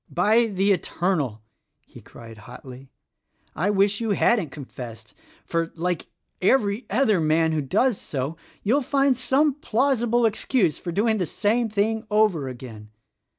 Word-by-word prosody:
"By 220 +7 +3
the 200 -1 +1
Eternal!" 160 - -1 0.4
he - - -15
cried 115 -2 -13
hotly, 125 +3 -12 0.7
"I 180 +7 0
wish 200 +1 +2
you 225 -3 0
hadn't 210 -10 +2
confessed; 120 -6 -10 0.3
for, 165 -1 -2
like 175 0 -2 0.3
every 210 +1 +1
other 215 -4 +2
man 160 +1 +2
who 155 -1 0
does 210 - +1
so, 140 +3 -4 0.3
you'll 255 +8 +2
find 275 0 +2
some 270 +4 +2
plausible 240 -3 +1
excuse 215 - 0
for 175 - -5
doing 215 +4 +1
the 180 - -1
same 225 +2 0
thing 215 +1 0
over 210 -9 +2
again. 120 -4 -9
200 Hz, 140 wpm, -24 LUFS, 155-230 Hz, 0.7 s, By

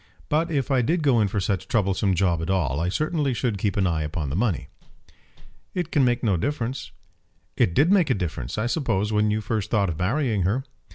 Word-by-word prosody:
But 160 +3 +1
if 140 -4 -1
I 130 -2 +3
did 160 +7 0
go 130 -6 +4
in 105 - +3
for 100 +1 -2
such 95 -1 -1
a - - -33
troublesome 100 -2 +1
job 85 -2 +1
at 80 - -4
all, 80 -8 0
I 85 +2 0
certainly 150 - 0
should 110 -3 -1
keep 100 -1 -1
an 100 - +2
eye 80 -3 0
upon 75 -2 -3
the - - -2
money." 100 - 0 1.1
"It 175 -3 -2
can 145 - +3
make 120 -1 +1
no 100 -6 +2
difference." 130 - -3 0.7
"It 85 - +2
did 155 +7 +4
make 185 -7 +4
a 130 - +3
difference, 80 -8 -4
I 105 - 0
suppose, 110 - 0
when 105 0 +2
you 105 +1 0
first 105 -1 -2
thought 100 -4 +2
of 80 - -4
marrying 110 +2 0
her?" 105 +9 0
105 Hz, 225 wpm, -24 LUFS, 95-135 Hz, 1.1 s, go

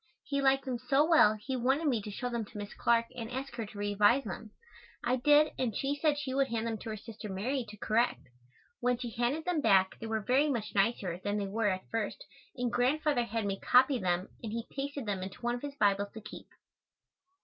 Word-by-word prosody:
He 280 -1 -1
liked 270 0 +3
them 250 -3 -2
so 270 +4 +3
well 315 -11 +6
he 260 +5 -4
wanted 265 +6 +1
me 250 -7 +2
to 210 - -7
show 230 +5 -4
them 235 -2 -2
to 205 - -12
Miss 205 0 -6
Clark 235 -1 +2
and 230 -2 -5
ask 265 +2 -5
her 230 -3 -4
to 205 - -12
revise 205 +5 +3
them. 215 +1 -6 0.5
I 250 +1 +1
did 295 +4 +5
and 240 -5 -1
she 275 +1 0
said 290 0 +1
she 275 -3 -3
would 275 0 +2
hand 230 -2 -2
them 225 -2 -2
to - - -7
her 215 - -4
sister 215 0 -9
Mary 240 +8 -1
to 210 - -10
correct. 220 - +1 0.6
When 245 0 +1
she 240 -1 -5
handed 245 +8 -1
them 355 -4 0
back 190 -6 +3
they 225 - -6
were 220 0 0
very 270 +7 +3
much 225 -6 -2
nicer 195 -4 0
than 205 0 -1
they 205 - -1
were 210 +2 0
at 185 -1 -3
first 225 - -3 0.3
and 245 -1 -1
Grandfather 265 0 +2
had 225 -1 -2
me 195 -1 -2
copy 260 +1 +4
them 180 -1 0
and 225 - -5
he 230 +1 -3
pasted 280 -1 -4
them 200 -3 -2
into 190 +5 -7
one 240 0 +1
of 245 - -4
his 285 -1 -6
Bibles 200 -4 +2
to 220 - -8
keep. 215 - -10
235 Hz, 230 wpm, -31 LUFS, 210-270 Hz, 0.6 s, well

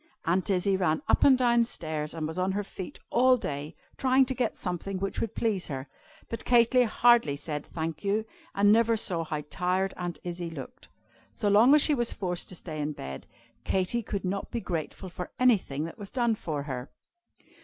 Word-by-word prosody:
Aunt 180 +3 +1
Izzie 190 0 +2
ran 160 -4 +1
up - - +3
and 265 -2 +7
down 240 -2 +4
stairs, 155 -8 -4
and 155 -1 -2
was 160 +3 -5
on 185 +1 +1
her 205 +1 -1
feet 190 -2 -8
all 255 +1 +5
day, 145 -5 -5 0.2
trying 265 0 +4
to 260 - -1
get 245 -3 -1
something 185 +1 -3
which 195 +1 -3
would 225 -1 -3
please 210 -6 0
her, 135 -2 -5 0.4
but 230 - -5
Katy 240 +1 +5
hardly 230 -8 +4
said 150 0 -5
"Thank 160 -1 -3
you," 205 +2 0 0.3
and 205 +1 +5
never 230 +1 +4
saw 175 -5 0
how 150 -1 -4
tired 185 +2 0
Aunt 175 -1 -4
Izzie 175 -1 -4
looked. 140 -6 -10 0.4
So 205 - 0
long 225 +8 +7
as 300 - +6
she 305 - +3
was 240 -4 0
forced 180 -3 -3
to 185 - -8
stay 155 -3 -6
in 150 +1 -2
bed, 65 - -8 0.4
Katy 190 - 0
could 200 -3 -4
not 195 +2 -2
be 235 - -3
grateful 175 0 -4
for 180 0 -6
anything 200 - +2
that 165 +7 -9
was 200 -1 -7
done 240 -3 +1
for 155 -9 -4
her. 130 -2 -5
190 Hz, 195 wpm, -28 LUFS, 160-230 Hz, 0.4 s, and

